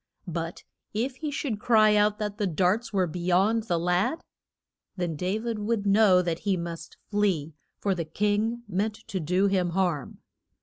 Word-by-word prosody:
But 165 Hz, -1 st, -5 dB, 0.3 s
if 250 Hz, +4 st, -1 dB
he 305 Hz, +1 st, -3 dB
should 275 Hz, -7 st, -3 dB
cry 215 Hz, -2 st, +5 dB
out 210 Hz, 0 st, +3 dB
that 210 Hz, -1 st, -4 dB
the 205 Hz, -, +1 dB
darts 185 Hz, +7 st, +1 dB
were 190 Hz, -3 st, +2 dB
be 175 Hz, +1 st, -6 dB
yond 195 Hz, +6 st, +2 dB
the 175 Hz, -5 st, 0 dB
lad, 180 Hz, -, 0 dB, 0.7 s
then 175 Hz, -3 st, -2 dB
Da 180 Hz, +7 st, -1 dB
vid 225 Hz, -1 st, -3 dB
would 210 Hz, 0 st, -1 dB
know 200 Hz, -3 st, +5 dB
that 170 Hz, -1 st, -2 dB
he 195 Hz, -2 st, 0 dB
must 170 Hz, -1 st, -6 dB
flee, 185 Hz, -7 st, +1 dB, 0.2 s
for 200 Hz, -, 0 dB
the 175 Hz, -2 st, -2 dB
king 210 Hz, +7 st, 0 dB
meant 205 Hz, +3 st, -1 dB
to 200 Hz, -3 st, -6 dB
do 180 Hz, +4 st, +1 dB
him 190 Hz, -3 st, +2 dB
harm. 175 Hz, -7 st, -1 dB
200 Hz, 175 wpm, -27 LUFS, 175-215 Hz, 0.7 s, cry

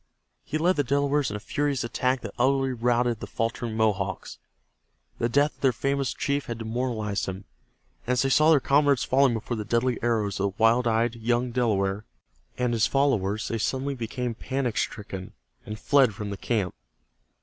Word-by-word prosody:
He 155 Hz, -, -3 dB
led 175 Hz, +4 st, +2 dB
the 145 Hz, -, +2 dB
Delawares 140 Hz, +1 st, +1 dB
in 105 Hz, -, -5 dB
a -, -, -4 dB
furious 145 Hz, +4 st, -1 dB
attack 125 Hz, +2 st, 0 dB
that -, -, -7 dB
utterly 135 Hz, +1 st, +2 dB
routed 120 Hz, -1 st, +1 dB
the -, -, -7 dB
faltering 115 Hz, 0 st, -3 dB
Mohawks. 100 Hz, -4 st, -1 dB, 0.8 s
The 115 Hz, -, +1 dB
death 145 Hz, +5 st, +2 dB
of -, -, -30 dB
their 135 Hz, -, +4 dB
famous 140 Hz, +2 st, -1 dB
chief 140 Hz, 0 st, -2 dB
had 115 Hz, -, -4 dB
demoralized 110 Hz, -3 st, -2 dB
them, 95 Hz, +1 st, -6 dB, 0.6 s
and 125 Hz, -, +2 dB
as 125 Hz, -, +2 dB
they 135 Hz, -, +1 dB
saw 155 Hz, +3 st, +5 dB
their 155 Hz, -3 st, +6 dB
comrades 140 Hz, 0 st, +3 dB
falling 130 Hz, -2 st, +3 dB
before 115 Hz, +2 st, -4 dB
the 105 Hz, -, -3 dB
deadly 120 Hz, +3 st, 0 dB
arrows 110 Hz, -4 st, 0 dB
of 100 Hz, 0 st, -1 dB
the -, -, -1 dB
wild 120 Hz, +2 st, +4 dB
eyed 115 Hz, +1 st, +2 dB
young 120 Hz, +2 st, 0 dB
Delaware 105 Hz, -4 st, 0 dB, 0.5 s
and 125 Hz, -1 st, 0 dB
his 115 Hz, -2 st, +3 dB
followers 110 Hz, -7 st, +1 dB
they 115 Hz, -, -2 dB
suddenly 135 Hz, +5 st, -1 dB
became 120 Hz, 0 st, -3 dB
panic 130 Hz, 0 st, -3 dB
stricken 95 Hz, -4 st, -4 dB, 0.3 s
and 105 Hz, 0 st, -5 dB
fled 130 Hz, -3 st, +3 dB
from 105 Hz, 0 st, -5 dB
the 100 Hz, -, -5 dB
camp. 100 Hz, -4 st, -1 dB
120 Hz, 180 wpm, -26 LUFS, 110-135 Hz, 0.8 s, their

